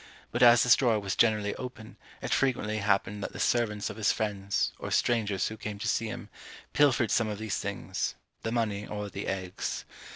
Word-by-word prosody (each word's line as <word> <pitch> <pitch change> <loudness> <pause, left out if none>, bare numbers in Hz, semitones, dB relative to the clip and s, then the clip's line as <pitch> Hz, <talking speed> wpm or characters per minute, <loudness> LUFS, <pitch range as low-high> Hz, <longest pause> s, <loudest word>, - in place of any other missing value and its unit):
But 120 - -2
as 120 0 +8
this 125 - +7
drawer 115 -5 +2
was 100 -2 -2
generally 105 -3 +3
open, 125 -4 -8 0.3
it - - 0
frequently 115 -5 +1
happened 100 0 +1
that - - -5
the - - -7
servants 105 -4 +1
of - - -10
his 110 -1 +3
friends, 100 -2 -1
or - - -5
strangers 105 -5 +1
who 110 - -7
came 105 -1 -5
to 100 - -4
see 115 - +1
him, 110 - -7 0.4
pilfered 130 -6 +4
some 115 - +3
of 105 -1 -3
these 110 -2 -2
things; - - -3 0.3
the 115 - -3
money 105 -3 -1
or 105 -1 -5
the - - -5
eggs. 95 -1 -3
110 Hz, 195 wpm, -29 LUFS, 105-120 Hz, 0.4 s, as